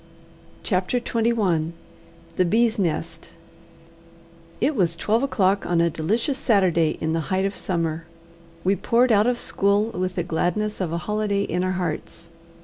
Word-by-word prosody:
CHAPTER 190 +5 0
XXI 220 -9 0 0.6
The 185 - +3
Bees' 225 +5 +2
Nest 170 -5 -2 1.3
It 295 - +1
was 175 -6 +1
twelve 215 +7 +1
o'clock 200 -7 +1
on 175 -1 +1
a 170 0 +2
delicious 225 - -1
Saturday 175 -8 +2
in 160 0 -1
the 165 - 0
height 190 +1 +1
of 195 - -2
summer. 165 -2 -2 0.6
We 195 +2 +2
poured 240 +4 +2
out 210 +1 +4
of 245 -1 +1
school 200 +3 +1
with 185 -1 -3
the 175 - -1
gladness 180 +6 -1
of 175 -4 -2
a 170 - -1
holiday 210 -1 0
in 180 -1 -1
our 185 0 0
hearts. 170 -1 -5
190 Hz, 150 wpm, -23 LUFS, 170-215 Hz, 1.3 s, out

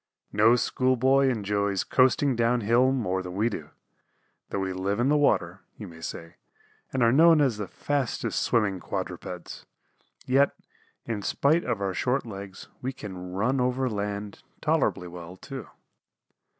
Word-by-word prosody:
No 110 +3 +5
school 130 +2 +1
boy 135 +2 +4
enjoys 100 -4 0
coasting 130 +1 +3
down 120 +1 +2
hill 120 +5 +3
more 105 -8 -1
than 90 -1 -7
we 110 +4 +2
do. 105 - -6 0.8
Though - - -3
we 95 -1 -2
live 95 +3 -2
in 125 +3 +2
the 150 - +4
water, 95 - +1 0.2
you 105 - -8
may 80 -2 -12
say, 85 +1 -7 0.5
and 130 -2 +1
are 115 - +5
known 160 +4 +6
as 130 -7 +2
the 105 -2 -4
fastest 140 +5 -2
swimming 100 -5 +1
quadrupeds, 90 0 -6 0.6
yet, 135 +2 +3 0.5
in 110 -3 -3
spite 150 - +2
of 105 - -2
our 95 -1 -1
short 125 +8 0
legs, 100 -3 -8
we 130 - -2
can 90 -6 -8
run 125 +7 +1
over 125 +1 +1
land 100 -2 -4 0.2
tolerably 90 - +1
well, 85 +1 -9
too. 135 +3 -8
110 Hz, 155 wpm, -27 LUFS, 95-130 Hz, 0.8 s, known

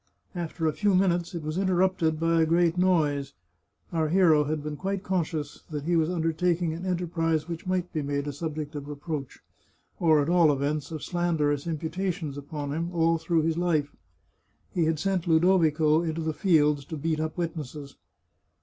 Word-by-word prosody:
After 170 -2 -4
a 155 - +2
few 205 +1 +2
minutes 180 -1 +1
it 165 - -4
was 155 +4 -2
interrupted 185 -4 +1
by 165 0 +2
a - - +4
great 170 +1 +3
noise. 155 -6 +1 0.6
Our 160 -2 +1
hero 160 -4 +4
had 150 0 -2
been 150 0 -4
quite 195 +4 -3
conscious 165 -6 -2
that 150 -3 -4
he 170 +3 +1
was 160 -1 +2
undertaking 170 0 0
an 175 +3 -5
enterprise 165 -3 0
which 170 +1 -6
might 185 -1 -1
be 155 - -1
made 140 0 -2
a 145 - -4
subject 155 0 -5
of 145 -1 -6
reproach, 145 -1 -6 0.6
or 160 -3 +4
at 145 - +1
all 170 -3 +5
events 145 +1 -1
of 160 -3 -6
slanderous 160 -5 0
imputations 165 -1 -3
upon 145 0 -5
him, 165 +3 -2
all 165 -1 +2
through 165 0 +1
his 165 +1 0
life 160 -5 0 0.8
He 170 -3 +2
had 160 0 +1
sent 185 0 -1
Ludovico 160 -2 +4
into 165 -1 -2
the 160 0 -1
fields 150 -5 +3
to 160 - -6
beat 155 +1 -1
up 155 +1 -3
witnesses. 155 -4 -5
160 Hz, 175 wpm, -27 LUFS, 150-175 Hz, 0.8 s, all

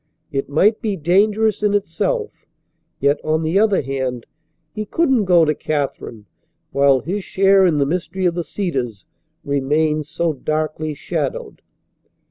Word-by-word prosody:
It 135 -2 -3
might 200 +10 +3
be 210 -3 -1
dangerous 205 +6 +2
in 205 -1 +2
itself, 435 - -1 0.7
yet, 140 +1 +2
on 155 +1 0
the 165 +5 +2
other 210 -5 +2
hand, 130 -3 -3 0.5
he 215 - -3
couldn't 260 -1 +1
go 175 -3 +5
to 155 - +2
Katherine 140 -8 -4 0.5
while 140 -2 +3
his 190 - -3
share 195 0 +4
in 160 -4 +1
the 140 - +2
mystery 180 +4 -2
of 175 - +2
the 175 0 -3
Cedars 135 - -4 0.4
remained 150 +2 0
so 165 +1 -1
darkly 155 +1 -3
shadowed. 150 -2 -4
160 Hz, 140 wpm, -20 LUFS, 140-195 Hz, 0.7 s, go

